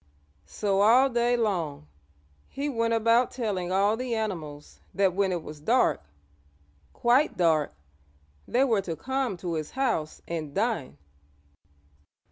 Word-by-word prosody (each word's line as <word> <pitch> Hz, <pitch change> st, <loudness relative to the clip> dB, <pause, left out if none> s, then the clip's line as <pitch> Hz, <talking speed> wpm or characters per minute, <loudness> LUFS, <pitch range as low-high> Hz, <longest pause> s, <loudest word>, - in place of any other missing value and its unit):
So 200 Hz, -, 0 dB
all 250 Hz, +6 st, +5 dB
day 240 Hz, 0 st, +2 dB
long 175 Hz, -, -2 dB, 0.6 s
he 285 Hz, +2 st, -3 dB
went 230 Hz, -3 st, 0 dB
about 230 Hz, +2 st, +3 dB
telling 200 Hz, -7 st, -3 dB
all 200 Hz, +3 st, +3 dB
the 245 Hz, 0 st, -3 dB
animals 160 Hz, -10 st, -5 dB, 0.2 s
that 195 Hz, -2 st, +2 dB
when 195 Hz, 0 st, +1 dB
it 175 Hz, -3 st, -3 dB
was 150 Hz, -1 st, -9 dB
dark 235 Hz, -, +2 dB, 0.9 s
quite 250 Hz, +5 st, +2 dB
dark 160 Hz, -4 st, +2 dB, 0.8 s
they 250 Hz, +3 st, +2 dB
were 225 Hz, -7 st, +2 dB
to 170 Hz, -4 st, -5 dB
come 265 Hz, -2 st, -2 dB
to 175 Hz, -1 st, -4 dB
his 155 Hz, -2 st, -3 dB
house 230 Hz, -, -2 dB
and 155 Hz, -4 st, -5 dB
dine. 200 Hz, -, -1 dB
205 Hz, 130 wpm, -27 LUFS, 170-240 Hz, 0.9 s, all